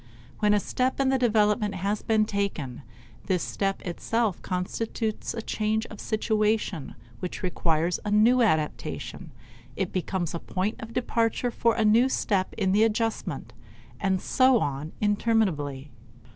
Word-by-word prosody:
When 210 Hz, -1 st, +4 dB
a -, -, +4 dB
step 255 Hz, +6 st, -1 dB
in 270 Hz, -1 st, +3 dB
the 265 Hz, 0 st, +2 dB
development 210 Hz, -3 st, +2 dB
has 200 Hz, +3 st, -1 dB
been 220 Hz, -1 st, +2 dB
taken, 200 Hz, -, -3 dB, 0.5 s
this 185 Hz, -3 st, +1 dB
step 195 Hz, -1 st, -2 dB
itself 210 Hz, +3 st, -1 dB
constitutes 215 Hz, +5 st, -3 dB
a 225 Hz, -, -4 dB
change 220 Hz, +1 st, 0 dB
of 215 Hz, -, -9 dB
situation 215 Hz, -6 st, 0 dB, 0.2 s
which 180 Hz, -, -5 dB
requires 170 Hz, -1 st, 0 dB
a 210 Hz, -, -3 dB
new 225 Hz, +5 st, +5 dB
adaptation; 160 Hz, -9 st, -1 dB, 0.5 s
it -, -, -2 dB
becomes 185 Hz, -2 st, -1 dB
the 170 Hz, -, -4 dB
point 190 Hz, +6 st, -3 dB
of 225 Hz, 0 st, -7 dB
departure 240 Hz, 0 st, 0 dB
for 230 Hz, 0 st, +2 dB
a 220 Hz, -, +2 dB
new 230 Hz, +5 st, +5 dB
step 195 Hz, -7 st, 0 dB
in 190 Hz, -3 st, +1 dB
the 210 Hz, +3 st, +4 dB
adjustment, 220 Hz, -, -1 dB, 0.5 s
and 190 Hz, -1 st, +1 dB
so 255 Hz, +4 st, +4 dB
on 145 Hz, 0 st, -3 dB
interminably. 190 Hz, -, 0 dB
210 Hz, 145 wpm, -27 LUFS, 185-225 Hz, 0.5 s, new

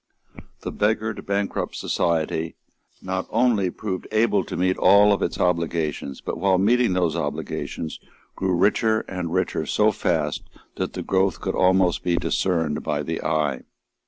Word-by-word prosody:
The -, -, -4 dB
beggared, 110 Hz, +1 st, 0 dB
the -, -, -6 dB
bankrupt 100 Hz, 0 st, -2 dB
society 80 Hz, -1 st, -1 dB, 0.5 s
not 95 Hz, 0 st, -3 dB
only 115 Hz, -5 st, +2 dB
proved 95 Hz, 0 st, -5 dB
able 110 Hz, -3 st, +2 dB
to -, -, -5 dB
meet 95 Hz, +1 st, +2 dB
all 100 Hz, +1 st, +6 dB
its -, -, -2 dB
obligations, 80 Hz, -5 st, -1 dB
but, -, -, -4 dB
while 95 Hz, 0 st, +3 dB
meeting 115 Hz, +2 st, +3 dB
those 90 Hz, -3 st, +1 dB
obligations, 80 Hz, -, -4 dB, 0.4 s
grew 95 Hz, -1 st, 0 dB
richer 110 Hz, +4 st, +2 dB
and 90 Hz, -3 st, -5 dB
richer 90 Hz, -4 st, -1 dB
so 105 Hz, +1 st, +3 dB
fast 80 Hz, -6 st, -1 dB, 0.4 s
that -, -, -2 dB
the -, -, -4 dB
growth 95 Hz, -3 st, +1 dB
could -, -, -2 dB
almost 95 Hz, -1 st, +3 dB
be 90 Hz, -1 st, +1 dB
discerned 85 Hz, -2 st, 0 dB
by 75 Hz, 0 st, -2 dB
the 80 Hz, +3 st, -3 dB
eye. 75 Hz, -4 st, 0 dB
90 Hz, 150 wpm, -23 LUFS, 80-100 Hz, 0.5 s, all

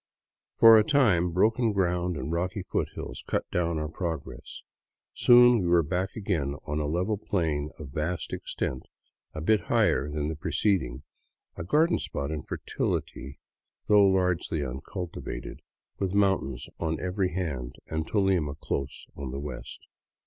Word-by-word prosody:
For 115 Hz, -1 st, +9 dB
a -, -, +4 dB
time 105 Hz, -, +3 dB
broken 110 Hz, +5 st, +2 dB
ground 90 Hz, -3 st, 0 dB
and 65 Hz, +3 st, -4 dB
rocky 90 Hz, +3 st, -2 dB
foothills -, -, -4 dB
cut -, -, -1 dB
down 85 Hz, -2 st, 0 dB
our 75 Hz, 0 st, -2 dB
progress. 80 Hz, -2 st, -6 dB, 0.5 s
Soon 120 Hz, -1 st, +6 dB
we 90 Hz, -, -1 dB
were 85 Hz, -1 st, +4 dB
back 95 Hz, +5 st, -2 dB
again 85 Hz, -10 st, -1 dB
on 75 Hz, +1 st, -2 dB
a 75 Hz, -, -1 dB
level 90 Hz, +7 st, -1 dB
plain 80 Hz, -8 st, -1 dB
of 75 Hz, -3 st, -8 dB
vast 80 Hz, +6 st, -3 dB
extent, 65 Hz, -, -4 dB, 0.5 s
a 80 Hz, -, -4 dB
bit 105 Hz, +6 st, +2 dB
higher 70 Hz, -, +2 dB
than 75 Hz, 0 st, -2 dB
the 80 Hz, -, -3 dB
pre 75 Hz, -, -5 dB
ceding, 70 Hz, -, +1 dB, 0.5 s
a -, -, -5 dB
garden 160 Hz, -, +3 dB
spot 70 Hz, +1 st, -4 dB
in 75 Hz, -2 st, -3 dB
fertility, 70 Hz, +1 st, -4 dB, 0.5 s
though 105 Hz, -1 st, +6 dB
largely 90 Hz, -5 st, +1 dB
uncultivated, 70 Hz, 0 st, -6 dB, 0.4 s
with 95 Hz, -1 st, -1 dB
mountains 95 Hz, -11 st, +1 dB
on 80 Hz, -1 st, -1 dB
every 90 Hz, 0 st, -1 dB
hand 70 Hz, -10 st, -3 dB
and 80 Hz, 0 st, -3 dB
Tolima 95 Hz, -8 st, +1 dB
close 70 Hz, -2 st, -4 dB
on 70 Hz, -2 st, -6 dB
the 70 Hz, +2 st, -5 dB
west. 75 Hz, +1 st, -7 dB
85 Hz, 150 wpm, -27 LUFS, 75-95 Hz, 0.5 s, For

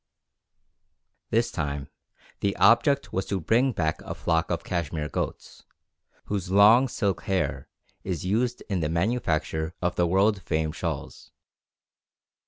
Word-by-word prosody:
This 115 Hz, +1 st, +1 dB
time 70 Hz, -5 st, -3 dB, 0.5 s
the 100 Hz, -1 st, 0 dB
object 140 Hz, +4 st, +4 dB
was 95 Hz, -, -1 dB
to 100 Hz, -, -1 dB
bring 120 Hz, -, +2 dB
back 80 Hz, -7 st, -1 dB
a -, -, -6 dB
flock 80 Hz, -1 st, 0 dB
of -, -, -2 dB
Cashmere 80 Hz, -3 st, -3 dB
goats, -, -, -5 dB, 0.6 s
whose 95 Hz, -3 st, -3 dB
long 105 Hz, +7 st, +6 dB
silk 100 Hz, -6 st, -1 dB
hair 75 Hz, -8 st, -1 dB, 0.3 s
is 90 Hz, -2 st, -3 dB
used 120 Hz, +6 st, 0 dB
in 95 Hz, -3 st, -1 dB
the 75 Hz, -2 st, -1 dB
manufacture 85 Hz, -4 st, -1 dB
of 90 Hz, -1 st, -1 dB
the 85 Hz, -, +3 dB
world 95 Hz, +3 st, +2 dB
famed 80 Hz, -2 st, -1 dB
shawls. -, -, -5 dB
95 Hz, 130 wpm, -26 LUFS, 80-110 Hz, 0.6 s, long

